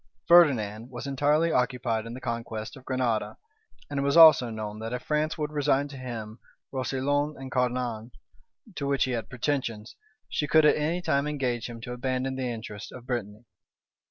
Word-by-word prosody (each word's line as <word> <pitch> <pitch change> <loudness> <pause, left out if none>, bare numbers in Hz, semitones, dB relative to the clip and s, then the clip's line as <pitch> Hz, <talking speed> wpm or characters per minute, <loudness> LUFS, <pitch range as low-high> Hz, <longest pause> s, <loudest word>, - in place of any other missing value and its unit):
Ferdinand 120 -10 +4
was 125 +1 -7
entirely 145 +4 +2
occupied 125 -4 0
in 115 - -7
the - - -7
conquest 115 -2 -5
of 135 - -13
Granada; 125 -4 -1 0.5
and 145 -1 -3
it - - +1
was 140 +3 +2
also 155 -7 +8
known, 110 -1 -5
that 115 +2 -5
if 125 - -4
France 150 +1 0
would 150 -1 -3
resign 145 -1 +1
to 140 - -10
him 115 -4 -7 0.3
Roussillon 140 +3 -1
and 135 -1 -8
Cerdagne, 125 -3 -1 0.6
to 145 -4 -3
which 140 -1 +2
he 130 - -1
had 115 -3 -3
pretensions, 125 -4 -3 0.3
she 150 - -2
could 155 +1 +5
at 150 - +6
any 165 +4 -1
time 140 -2 +1
engage 125 -6 -2
him 115 -1 -8
to 125 +1 -6
abandon 130 +1 -2
the 130 -1 -2
interests 110 -3 -7
of 125 -1 -11
Brittany. 110 -3 -4
130 Hz, 180 wpm, -27 LUFS, 115-145 Hz, 0.6 s, also